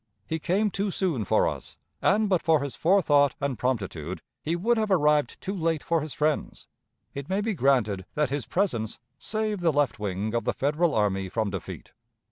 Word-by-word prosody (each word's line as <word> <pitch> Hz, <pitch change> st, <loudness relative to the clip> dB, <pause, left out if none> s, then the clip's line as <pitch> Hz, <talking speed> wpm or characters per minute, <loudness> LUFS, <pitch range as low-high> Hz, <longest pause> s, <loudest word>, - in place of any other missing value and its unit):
He 160 Hz, 0 st, -3 dB
came 195 Hz, +6 st, +1 dB
too 200 Hz, +2 st, -1 dB
soon 170 Hz, -, -1 dB
for -, -, +3 dB
us, -, -, -6 dB, 0.2 s
and, 210 Hz, +2 st, +3 dB
but 185 Hz, -4 st, +2 dB
for 160 Hz, -2 st, +3 dB
his 140 Hz, -, -4 dB
forethought 150 Hz, -6 st, +3 dB
and 140 Hz, -2 st, -1 dB
promptitude, 95 Hz, -, -2 dB, 0.2 s
he 165 Hz, +2 st, -1 dB
would 225 Hz, +8 st, +2 dB
have 215 Hz, -2 st, 0 dB
arrived 150 Hz, -7 st, +2 dB
too 195 Hz, -, -3 dB
late 165 Hz, -5 st, -1 dB
for 165 Hz, -1 st, +1 dB
his 150 Hz, -3 st, -6 dB
friends. 150 Hz, 0 st, -1 dB, 0.5 s
It 140 Hz, 0 st, -6 dB
may 190 Hz, +1 st, +1 dB
be 220 Hz, +1 st, 0 dB
granted 120 Hz, -, +1 dB
that 150 Hz, -3 st, +1 dB
his 140 Hz, -2 st, -2 dB
presence 120 Hz, -, -1 dB, 0.2 s
saved 215 Hz, -, -2 dB
the 170 Hz, -2 st, +3 dB
left 145 Hz, -5 st, +1 dB
wing 105 Hz, +1 st, -2 dB
of 120 Hz, -, 0 dB
the -, -, 0 dB
Federal 155 Hz, +4 st, +1 dB
army 95 Hz, -3 st, +1 dB
from 110 Hz, 0 st, -1 dB
defeat. 95 Hz, -3 st, -7 dB
150 Hz, 190 wpm, -26 LUFS, 120-185 Hz, 0.5 s, for